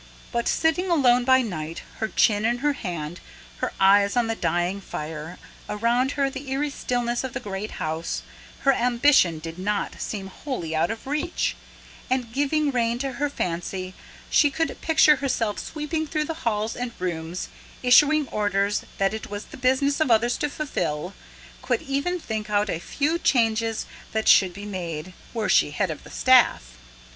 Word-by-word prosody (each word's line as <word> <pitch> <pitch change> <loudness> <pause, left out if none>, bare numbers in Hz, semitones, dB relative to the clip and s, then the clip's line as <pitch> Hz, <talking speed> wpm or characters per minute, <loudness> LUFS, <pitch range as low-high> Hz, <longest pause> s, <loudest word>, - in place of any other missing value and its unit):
But 235 -1 -1
sitting 340 +3 +1
alone 250 -7 +4
by 260 0 +5
night, 165 -6 -5 0.2
her 220 - 0
chin 210 -1 +2
in 235 +2 +2
her 295 - +3
hand, 175 - -5 0.4
her - - -2
eyes 200 +3 +5
on 240 - +3
the 225 0 -1
dying 180 0 -1
fire, 155 0 -6 0.3
around 240 +5 +1
her 275 -1 +1
the 270 0 -6
eerie 285 +2 -1
stillness 245 -2 -1
of 260 - -5
the 270 - -3
great 205 -2 -5
house, 160 +1 -3 0.4
her 275 - +4
ambition 240 - +4
did 165 +2 -8
not 205 +2 -2
seem 200 -3 -4
wholly 190 - -5
out 160 +2 +2
of 225 +3 -5
reach; 300 +5 -1 0.5
and, 250 -3 -1
giving 290 +2 +1
rein 235 -2 +1
to 270 +2 -2
her 290 +3 -1
fancy, 185 -3 -3 0.4
she 295 - +5
could 320 +4 -2
picture 310 -2 +5
herself 240 -6 -1
sweeping 315 +1 -3
through 305 0 -1
halls 230 -8 -2
and 245 -1 -4
rooms, 170 -1 -4 0.3
issuing 290 +4 +5
orders 205 -1 0
that 195 +1 +1
it 220 - -6
was 205 +1 -5
the - - -12
business 265 +3 +1
of 315 - +2
others 235 +1 +3
to 295 - -1
fulfil, 185 - -3 0.5
could 250 -2 -1
even 280 +7 -1
think 215 -7 -4
out 205 -1 +1
a 165 - -2
few 300 - -1
changes 225 -5 +1 0.3
that 220 0 -1
should 190 -2 +6
be 200 +3 -9
made, 180 -3 -5 0.2
were 225 -3 -2
she - - +4
head 165 +4 -1
of 155 - -7
the - - -13
staff. 250 - +4
230 Hz, 170 wpm, -24 LUFS, 195-275 Hz, 0.5 s, should